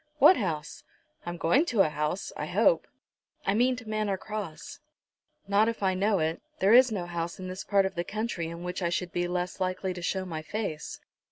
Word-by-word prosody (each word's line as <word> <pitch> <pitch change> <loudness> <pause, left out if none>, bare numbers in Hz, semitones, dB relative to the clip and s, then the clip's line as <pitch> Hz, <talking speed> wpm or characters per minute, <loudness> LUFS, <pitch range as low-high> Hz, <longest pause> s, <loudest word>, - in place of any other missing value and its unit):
What 300 +6 +8
house? 165 - -3 0.4
I'm 175 0 -3
going 170 - +3
to 220 -5 +3
a 160 - +4
house, 150 +5 -2
I - - -4
hope." - - +3 0.6
"I 195 - +2
mean 250 +4 +3
to 245 -2 -10
Manor 215 -2 -1
Cross." 205 -5 -6 0.7
"Not 205 +3 +4
if 230 -3 -4
I 190 -1 +3
know 200 +2 +2
it. 160 -1 -1 0.2
There 195 +3 +4
is 250 0 +7
no 190 -5 -2
house 170 -1 -4
in 185 - -5
this 185 +1 -5
part 200 -1 +3
of 190 - -2
the 175 - -2
country 210 -4 -3
in 170 +1 -7
which 180 +1 -4
I 170 - +1
should 175 0 -2
be 175 0 -1
less 180 +1 -3
likely 185 0 -1
to 180 - -7
show 185 +2 -1
my 160 -3 -4
face." 180 -3 -4
185 Hz, 210 wpm, -28 LUFS, 175-215 Hz, 0.7 s, What